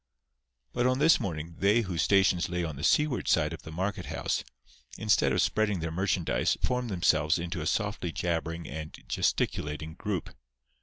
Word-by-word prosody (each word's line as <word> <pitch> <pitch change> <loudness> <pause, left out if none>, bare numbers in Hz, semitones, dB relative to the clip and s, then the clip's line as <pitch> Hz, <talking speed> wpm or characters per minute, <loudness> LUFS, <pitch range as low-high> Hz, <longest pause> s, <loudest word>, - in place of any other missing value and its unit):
But 120 - +2
on 130 0 +2
this 155 +4 +5
morning 85 -2 -5
they 105 +4 +4
whose 90 -7 -2
stations 95 +1 +3
lay 90 0 -1
on 80 -3 -4
the 70 - -7
seaward 150 -4 +2
side - - +2
of - - -8
the 80 - -10
market 95 +5 -3
house, - - -2 0.5
instead - - +3
of - - +3
spreading 105 -3 +1
their 80 0 -3
merchandise 90 0 0
formed 125 -1 0
themselves 80 -5 +2
into 85 0 -4
a 80 - -2
softly 100 -1 -1
jabbering 85 +1 -2
and 75 +1 -7
gesticulating 75 +2 -1
group. 95 +1 -4
90 Hz, 165 wpm, -29 LUFS, 80-105 Hz, 0.5 s, this